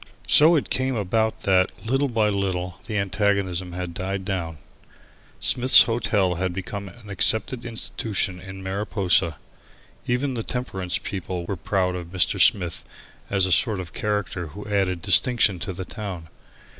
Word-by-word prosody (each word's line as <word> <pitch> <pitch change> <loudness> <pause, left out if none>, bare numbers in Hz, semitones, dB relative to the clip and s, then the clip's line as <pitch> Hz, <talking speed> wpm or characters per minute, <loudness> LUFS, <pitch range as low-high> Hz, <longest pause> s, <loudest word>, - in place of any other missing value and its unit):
So 160 +3 +6
it 150 - -1
came 130 0 -1
about 110 +2 -1
that, 95 -1 +2
little 135 +5 +1
by 115 -4 +1
little, 95 -2 -3
the 110 -2 -3
antagonism 100 -3 -1
had 90 -1 -5
died 95 +2 -4
down. 85 -4 -3 0.8
Smith's 130 0 +8
Hotel 110 -5 0 0.2
became 95 +2 -6
an 105 +2 -13
accepted 110 +6 +1
institution 110 -4 -2
in 95 0 -9
Mariposa. 95 -4 +1 0.7
Even 130 +3 0
the 120 - -3
temperance 95 -7 -3
people 90 -2 -5
were 100 - -3
proud 90 +2 -1
of 85 -2 -7
Mr. 90 0 +1
Smith 90 -4 +3 0.5
as 95 -2 +2
a 95 - -2
sort 110 0 +3
of 90 -2 -8
character 105 -4 -3
who 100 +8 -10
added 95 -4 -1
distinction 115 -7 +3
to 85 - -4
the 95 0 -6
town. 95 -7 -7
95 Hz, 145 wpm, -23 LUFS, 90-110 Hz, 0.8 s, Smith's